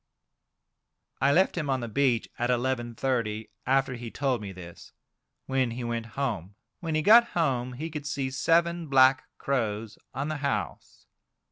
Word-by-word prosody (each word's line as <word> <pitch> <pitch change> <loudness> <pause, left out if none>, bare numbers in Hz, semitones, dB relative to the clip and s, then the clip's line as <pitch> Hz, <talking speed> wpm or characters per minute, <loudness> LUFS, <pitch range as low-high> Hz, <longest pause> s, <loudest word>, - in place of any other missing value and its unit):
I 140 +1 +4
left 185 +6 +3
him 155 -5 -2
on 130 -2 0
the 120 - -4
beach 125 -1 +1
at 120 +1 0
11.30, 120 -3 -1 0.2
after 135 0 +2
he 120 -1 -6
told 130 -2 -1
me 100 -2 -6
this, 90 -2 -12 0.5
when 130 -2 +1
he 120 +2 -5
went 115 -1 -3
home. 105 -9 -2 0.2
When 165 -2 -3
he 155 - +1
got 230 +5 +8
home 130 -6 0
he 155 +6 -5
could 150 -1 -5
see 135 -2 -2
seven 170 +5 +1
black 130 -1 +5
crows 110 -5 -2
on 135 +3 -3
the 155 0 -2
house. 140 -1 -4
130 Hz, 155 wpm, -27 LUFS, 120-140 Hz, 0.5 s, got